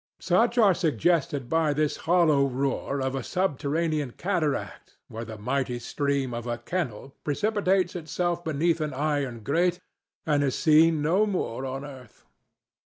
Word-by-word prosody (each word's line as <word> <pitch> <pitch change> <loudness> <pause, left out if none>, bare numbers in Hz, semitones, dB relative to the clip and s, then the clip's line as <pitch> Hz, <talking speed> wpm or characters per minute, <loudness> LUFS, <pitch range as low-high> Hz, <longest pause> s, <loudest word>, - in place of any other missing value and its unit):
Such 225 +7 +2
are 210 -5 +6
suggested 155 - 0
by 160 0 +2
this 150 0 0
hollow 155 -6 +4
roar 135 +1 -2
of 130 0 -1
a 135 - -2
subterranean 155 -2 -1
cataract 170 -7 -3
where 115 +1 -6
the 110 -1 -8
mighty 125 +3 -1
stream 140 +1 -1
of 120 0 -5
a 120 0 -2
kennel 135 -2 -4
precipitates 190 +3 +1
itself 175 +1 -2
beneath 160 +1 0
an 150 -3 -3
iron 140 -5 -1
grate 175 - +1 0.5
and 145 -2 +2
is 135 -2 0
seen 160 -1 +4
no 185 +8 +3
more 135 - -2
on 135 +2 -5
earth. 130 -5 -13
150 Hz, 145 wpm, -26 LUFS, 135-175 Hz, 0.5 s, are